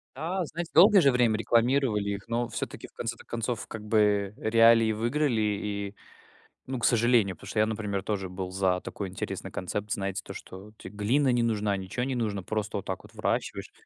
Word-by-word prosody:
Да, 170 +6 -2
знаете, 170 +2 -6
долгое 195 +4 +8
же 140 -4 +5
время 120 -3 +3
рекламировали 115 -2 +2
их, 100 +2 -6
но 120 +1 0
всё-таки, - - -6
в - - -27
конце-то 120 0 -5
концов, 115 -1 -3
как 110 -1 -7
бы, 105 -2 +2
э, 110 - -2
реалии 115 0 +6
выиграли, 120 +2 0
и, 100 -1 -2 0.7
ну, 130 0 -3
к 120 - -1
сожалению. 115 -4 +3
Потому - - -13
что - - -6
я, 110 - +5
например, 105 -3 -3
тоже 95 -3 -2
был 90 0 -5
за 95 -1 +1
такой 100 - -5
интересный 95 - -5
концепт, 105 +3 -4
знаете, 95 -1 -2
то - - -8
что 95 +3 -10
те - - -9
глина 120 +7 +1
не 120 -1 +2
нужна, 105 -3 +1
ничего 95 +6 -4
не 135 +1 -2
нужно, 105 -6 -2
просто 105 +1 -2
вот 100 - -5
так 95 - -4
вот - - -17
выращиваешь. - - -2
110 Hz, 200 wpm, -28 LUFS, 100-120 Hz, 0.7 s, долгое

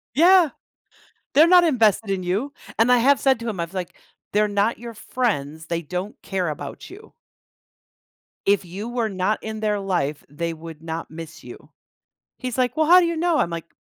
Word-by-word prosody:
Yeah! 350 0 +6 0.8
They're 315 +4 +7
not 355 0 +7
invested 225 - +2
in 190 -2 -1
you, 210 +11 -2 0.3
and 240 +2 +4
I 250 - +6
have 275 +4 +4
said 265 -3 +2
to 230 0 -4
him, 190 -5 -5
I 170 - 0
was, 170 - -19
like, 180 -2 -4 0.4
"They're 210 0 +3
not 205 +3 0
your 235 -1 -8
friends. 160 - -2
They 170 0 -2
don't 180 +6 -5
care 185 -4 -2
about 150 - -7
you" 425 +4 -14 1.3
"if 200 -1 +3
you 190 +6 -7
were 240 -2 -1
not 190 +2 0
in 220 0 -5
their 210 -1 0
life, 155 -7 -2
they 165 +3 -3
would 160 -1 -10
not 165 0 -6
miss 160 -1 -10
you." - - -12 0.7
He's, 255 -1 -4
like, 250 0 +1
"Well, 315 -1 +2
how 360 +2 +8
do - - +2
you 335 -1 -2
know?" 340 -1 +2
I'm, 170 - +1
like, 170 0 -5
210 Hz, 195 wpm, -23 LUFS, 170-255 Hz, 1.3 s, how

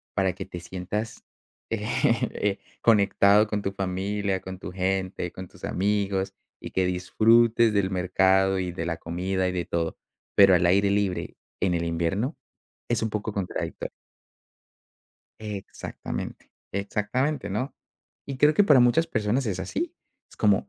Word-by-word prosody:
para 95 -2 +2
que 95 - -7
te 90 - -7
sientas, 95 +5 -5 0.5
eh, 105 -2 0 0.2
conectado 105 -1 +5
con 105 -1 -2
tu 95 - -1
familia, 95 +1 -2
con 95 0 -7
tu 95 - -7
gente, 95 -1 -1
con 95 0 -8
tus - - -19
amigos 100 0 0 0.3
y - - -7
que 95 - +1
disfrutes 110 +5 +4
del 100 -2 +2
mercado 95 +1 +3
y 90 -1 -2
de 85 -1 -4
la 85 -1 -2
comida 95 +2 -1
y - - 0
de 90 -1 -2
todo. 85 -1 -2 0.4
Pero 95 -2 +7
al 90 0 +3
aire 100 +3 +4
libre 100 -2 -1 0.2
en 95 -2 +1
el 85 - -1
invierno 85 - -1 0.5
es 120 -2 0
un 110 - 0
poco 105 +1 -2
contradictorio. 100 -3 -4 1.5
Exactamente. 105 -3 -6 0.2
Exactamente, 105 +6 -1
¿no? 125 +8 -2 0.5
Y 140 - -5
creo 150 +4 +5
que 205 - +5
para 145 -9 +6
muchas 125 +8 +4
personas 120 -2 0
es 100 -4 -2
así. 340 +1 -3 0.4
Es - - -17
como - - +2
100 Hz, 150 wpm, -26 LUFS, 95-110 Hz, 1.5 s, Pero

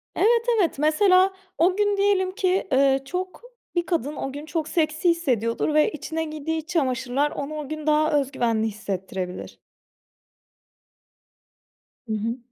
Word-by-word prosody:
Evet, 465 +1 +3
evet, 335 -7 +1
mesela 370 +5 +4 0.2
o 360 +3 +3
gün 410 0 +1
diyelim 395 -2 +2
ki, 380 -1 0
eee, 270 0 +4
çok, 365 +4 -5 0.3
bir 345 -1 +1
kadın 305 -4 -1
o 270 - -4
gün 290 +2 -7
çok 315 -1 -3
seksi 315 +2 +1
hissediyordur 260 -6 0
ve 305 0 +4
içine 320 +2 -4
giydiği 310 0 -3
iç 320 +1 -7
çamaşırlar 270 -3 0
onu 285 +2 -5
o 295 -3 -6
gün 310 0 -5
daha 305 0 +3
öz 275 -1 -3
güvenli 225 -3 0
hissettirebilir. 190 -3 -5 2.5
Hı 220 - -2
hı. 225 +3 -2
310 Hz, 145 wpm, -24 LUFS, 265-360 Hz, 2.5 s, mesela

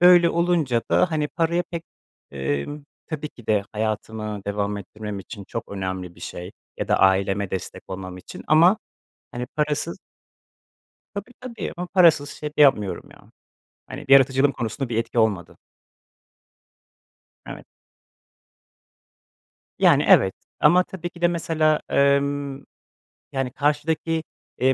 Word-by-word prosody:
böyle 175 -1 +7
olunca 165 -9 +1
da 180 - +3
hani, 150 -2 0
paraya 170 +1 0
pek, 170 -1 -4 0.5
emm, 70 - -3 0.2
tabii 155 -2 -4
ki 120 -6 -17
de 105 -2 +2
hayatımı 110 -1 -3
devam 100 0 -1
ettirmem 105 0 -7
için 100 +1 -9
çok - - -5
önemli 95 -2 -4
bir 85 - -18
şey 90 +2 -7 0.3
ya - - -4
da - - +3
aileme 95 +1 +2
destek 95 - -5
olmam 95 -1 -6
için, 90 - -10
ama 170 +7 +5 0.5
hani, 125 0 -4
parasız 150 +3 -1 1.2
Tabii 200 +5 -6
tabii 255 -2 -6
ama 180 0 -4
parasız 165 -6 +4
şey 150 - -6
de 150 0 +1
yapmıyorum 105 -9 +3
ya, - - -19 0.6
hani, - - -8
yaratıcılığım 135 +1 +5
konusunda 120 +3 -4
bir 115 - -3
etki 115 +1 -1
olmadı. 105 -6 +1 1.9
Evet. - - -9 2.1
Yani, - - +5
evet, 95 - +6 0.3
ama 175 +5 +5
tabii 175 -2 -7
ki 175 0 -16
de 175 - +5
mesela, 160 -2 +1
emm, 140 0 +1 0.7
yani, 135 -2 -2
karşıdaki, 155 +3 0 0.4
eee, 130 +1 +4
140 Hz, 130 wpm, -23 LUFS, 105-160 Hz, 2.1 s, böyle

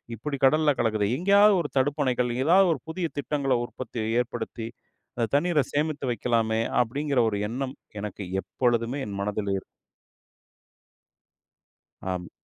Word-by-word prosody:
இப்டி 140 +4 -4
கடல்ல 155 +1 +4
கலக்குதே. 110 -3 +1
எங்கேயாவது 200 +3 +5
ஒரு 145 - -4
தடுப்பணைகள் 130 -3 +1
ஏதாவது 185 +5 +5
ஒரு 135 - -7
புதிய 170 0 -2
திட்டங்களை 140 -3 0
உற்பத்தி 120 -2 -6 0.2
ஏற்படுத்தி, 120 -2 -5 0.5
அந்த 115 -1 +1
தண்ணீர 155 -3 +2
சேமித்து 150 -2 -1
வைக்கலாமே, 115 -1 +1 0.2
அப்டின்கிற 140 +2 0
ஒரு 100 - -2
எண்ணம் 130 +2 -4 0.3
எனக்கு 105 -1 -5 0.2
எப்பொழுதுமே 120 +2 0
என் 100 -1 -5
மனதில் 100 0 -2
இருக்கும் - - -8 2.5
ஆமா. 90 -1 -4
130 Hz, 120 wpm, -26 LUFS, 115-150 Hz, 2.5 s, எங்கேயாவது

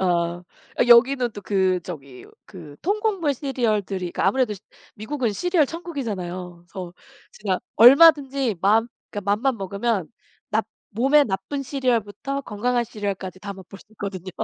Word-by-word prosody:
어. 190 - +1
어 170 0 0 0.5
여기는 245 +1 +6
또 205 - -9
그 190 -2 +1
저기 140 -7 -9 0.2
그 160 -7 -12
통곡물 400 -5 0
시리얼들이 215 - -2
그 - - -5
아무래도 255 -5 +2 0.4
미국은 235 +1 -2
시리얼 350 - +2
천국이잖아요. 190 - -6
그래서 180 0 -7 0.4
제가 195 -3 -2 0.2
얼마든지 270 - +6
마음 220 +4 +3 0.2
그니까 205 -1 -3
맘만 260 +2 0
먹으면 200 -1 -2 0.4
납 220 0 0 0.2
몸에 270 +7 +4
나쁜 275 +6 -3
시리얼부터 255 0 -1
건강한 240 +1 -1
시리얼까지 200 -4 -5
다 200 +1 -6
맛볼 195 0 -12
수 - - -18
있거든요. 195 -3 -6
215 Hz, 335 characters per minute, -23 LUFS, 190-270 Hz, 0.5 s, 여기는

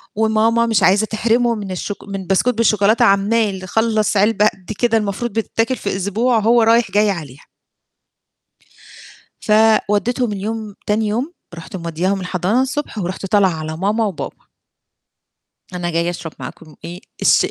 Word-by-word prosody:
وماما 220 +2 +2
مش 220 -4 +1
عايزة 200 +3 +4
تحرمهم 230 +2 +1
من 200 -2 -6
الشوك 200 +2 -5
من 195 -2 -6
بسكوت 195 +6 +2
بالشوكولاتة 220 0 +3
عمّال 200 -1 +1
خلص 220 +1 +1
علبة 210 +1 +3
قد 195 -1 -6
كده 235 -2 +2
المفروض 210 +3 -3
بتتاكل 225 +2 -1
في 200 - -4
أسبوع 220 +5 +1
هو 230 +2 +4
رايح 230 -2 +3
جاي 210 +1 +3
عليها. 150 -8 -6 2.0
فوديتهم 220 +2 +2
اليوم 210 +1 -5
تاني 215 +1 +1
يوم 245 +11 -2 0.2
رُحت 170 +3 -9
مودياهم 180 +3 -2
الحضانة 185 +6 0
الصبح 265 -1 -3
ورُحت 190 0 -4
طالعة 195 0 +3
على 155 -1 -5
ماما 210 +5 0
وبابا. 195 -7 -6 1.3
أنا 175 -1 -3
جاية 170 +1 0
أشرب 170 -2 -6
معاكم 150 +4 -10
إيه 175 +1 -7 0.2
الشاي - - +4
210 Hz, 140 wpm, -18 LUFS, 190-225 Hz, 2.0 s, عايزة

